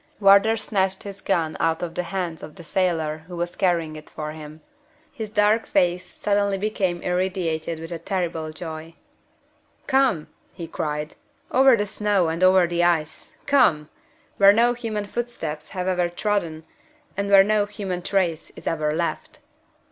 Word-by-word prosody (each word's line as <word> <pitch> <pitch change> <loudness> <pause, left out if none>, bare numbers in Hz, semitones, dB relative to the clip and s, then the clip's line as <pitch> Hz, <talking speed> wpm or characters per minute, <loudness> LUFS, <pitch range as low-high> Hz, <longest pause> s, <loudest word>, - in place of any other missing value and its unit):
Wardour 200 +2 +5
snatched 190 -3 -1
his 200 -1 -8
gun 165 -5 0
out 165 +1 0
of 170 -2 -4
the - - -1
hands 175 -2 -4
of 150 - -10
the 175 - -11
sailor 160 -3 0
who 180 - -8
was 175 +1 -3
carrying 170 -4 0
it 155 0 -11
for 150 -1 -6
him. 155 0 -10 0.5
His 220 -6 -5
dark 210 +1 +2
face 180 -1 +1
became - - -22
suddenly 200 -3 0
irradiated 180 -3 -1
with 165 +1 -7
a 170 - -4
terrible 165 -5 -3
joy. 160 0 -8 0.9
"Come!" 265 - +2 0.3
he 170 - -7
cried. 150 -1 -4 0.4
"Over 265 -1 +6
the 205 - 0
snow 205 -4 +1
and 165 +3 -2
over 185 -1 +6
the 175 0 0
ice! 160 -3 -1
Come! 170 - +3 0.5
where 200 0 +8
no 235 +3 +3
human 225 -4 -4
footsteps 200 -10 -4
have 185 -1 -4
ever 180 -2 +1
trodden, 175 -4 -2 0.5
and 200 +1 -2
where 195 -1 +8
no 210 0 +1
human 195 -4 -4
trace 175 -4 -1
is - - -12
ever 155 -2 0
left." 170 +1 -3
180 Hz, 160 wpm, -23 LUFS, 160-200 Hz, 0.9 s, where